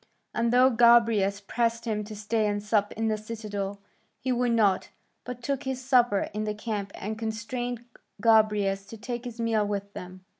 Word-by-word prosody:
And 235 0 +1
though 255 +2 +5
Gobryas 230 -4 +4
pressed 230 0 0
him 215 -2 -1
to 215 +1 -8
stay 215 +1 0
and 205 0 -2
sup 210 -1 +1
in 225 +1 -1
the 215 -1 +1
citadel, 205 -2 -5 0.4
he 260 - -2
would 245 -1 +1
not, 205 -5 +2 0.4
but 250 -1 -7
took 275 +1 -1
his 265 -2 -3
supper 245 -6 +3
in 210 +1 -2
the 210 0 -2
camp 210 -2 -4
and 215 +2 -5
constrained 235 +2 -4 0.3
Gobryas 210 -3 +3
to 225 - -9
take 240 +2 -5
his 240 -1 -7
meal 225 -2 +1
with 200 -1 -3
them. 185 +1 -9
220 Hz, 180 wpm, -27 LUFS, 205-235 Hz, 0.4 s, though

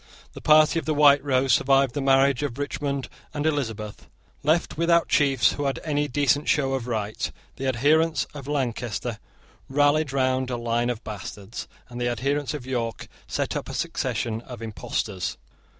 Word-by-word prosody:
The - - -10
party 155 +1 +5
of - - -8
the 155 - 0
White 145 -1 +6
Rose 130 -2 +2
survived 135 -1 +3
the 145 - -2
marriage 135 -1 +4
of 140 -4 -3
Richmond 140 -1 -3 0.3
and 145 0 -2
Elizabeth. 115 -9 -2 0.3
Left 155 +4 +1
without 170 +1 +3
chiefs 135 -4 +4
who 145 - -3
had 135 - -1
any 145 -2 0
decent 145 +2 +1
show 135 -2 +2
of 130 -2 -2
right, 110 -3 -2 0.3
the 135 - -3
adherents 145 +4 +2
of 140 -2 -8
Lancaster 120 -5 -2 0.5
rallied 145 +1 +3
round 130 -1 +1
a 125 - -2
line 120 +1 0
of 120 -2 -3
bastards, 105 0 -7 0.2
and 120 0 -7
the 120 - +1
adherents 140 +5 -1
of 135 -4 -7
York 120 -4 -3 0.2
set - - -2
up - - -4
a - - -5
succession 115 -1 -2
of 120 -2 -9
impostors. 105 -3 -3
135 Hz, 165 wpm, -25 LUFS, 120-145 Hz, 0.5 s, White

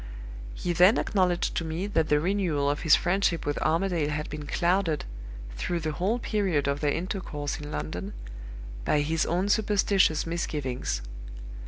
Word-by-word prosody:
"He 175 - -2
then 180 +5 +6
acknowledged 180 -3 +1
to - - 0
me 165 +4 -3
that 165 -6 0
the 150 - +4
renewal 165 -5 +1
of 145 - -3
his 155 - +5
friendship 175 -2 +1
with 145 - -1
Armadale 165 -1 +1
had 150 0 -3
been 150 -1 -6
clouded, 170 -1 +1 0.5
through 170 - -2
the 155 0 -2
whole 190 +9 0
period 195 - 0
of 140 0 0
their 150 - +1
intercourse 165 -4 -3
in 150 0 -7
London, 90 +6 -4 0.7
by 150 - +2
his 160 +2 0
own 180 +3 0
superstitious 200 -5 +2
misgivings. 140 - -3
165 Hz, 155 wpm, -27 LUFS, 145-185 Hz, 0.7 s, then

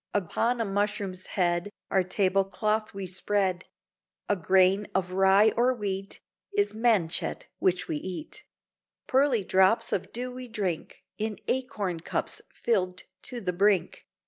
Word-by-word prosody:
Upon 225 +6 0
a 230 - +1
mushroom's 200 -2 -2
head 175 0 0 0.2
Our 190 - +4
table 190 +1 +2
cloth 215 +3 -1
we 195 -1 -5
spread; 185 0 0 0.6
A 205 - +2
grain 190 +2 +3
of 185 -1 0
rye 195 +3 +5
or 250 +2 +3
wheat 195 -3 -4 0.4
Is 410 0 +2
manchet 215 -7 +1
which 185 -1 +1
we 155 - -2
eat; 305 - -7 0.6
Pearly 260 -5 +3
drops 190 +4 +4
of 190 0 -2
dew 250 +2 -3
we 255 0 -8
drink 200 -8 -4 0.2
In 215 -1 -2
acorn 220 -10 -2
cups 160 - -3
filled 185 -6 -1 0.2
to 245 - -6
the 180 -3 -1
brink. 195 0 +1
195 Hz, 140 wpm, -28 LUFS, 185-220 Hz, 0.6 s, rye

